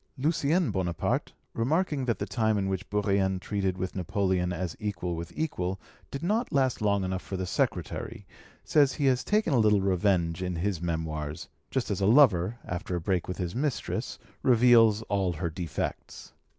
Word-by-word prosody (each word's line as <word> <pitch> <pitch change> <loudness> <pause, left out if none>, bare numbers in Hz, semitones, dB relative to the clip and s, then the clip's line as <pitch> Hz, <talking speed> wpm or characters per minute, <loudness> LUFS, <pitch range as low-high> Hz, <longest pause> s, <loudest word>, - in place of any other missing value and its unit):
Lucien 155 - +1
Bonaparte, 90 -4 -1 0.2
remarking 145 +3 0
that 115 -3 0
the - - -3
time 110 -3 +1
in 95 -1 0
which 95 -1 -3
Bourrienne 100 -2 +1
treated 95 -1 -2
with 95 0 -4
Napoleon 95 -1 0
as 90 -1 -3
equal 95 -4 -3
with 85 +1 -6
equal 95 - -2 0.3
did 140 - -6
not 220 +7 0
last 130 -4 +1
long 100 -2 +2
enough 95 0 -2
for 95 - -5
the 95 - -2
secretary, - - -2 0.4
says 145 -3 +3
he 145 - -1
has 130 -2 +3
taken 210 -7 +1
a 125 - +4
little 105 -2 +4
revenge 90 -3 +1
in 90 -1 -2
his 90 0 -2
Memoirs, 80 -3 -3 0.2
just 130 -5 -2
as 100 - -2
a 95 - +3
lover, 110 -5 +5
after 90 +1 -4
a - - -1
break 90 0 -1
with 90 - -4
his 90 -3 -3
mistress, 135 +2 -2 0.2
reveals 115 -3 +5
all 95 -4 0
her 85 +1 -3
defects. 85 -1 -5
100 Hz, 175 wpm, -28 LUFS, 90-125 Hz, 0.4 s, lover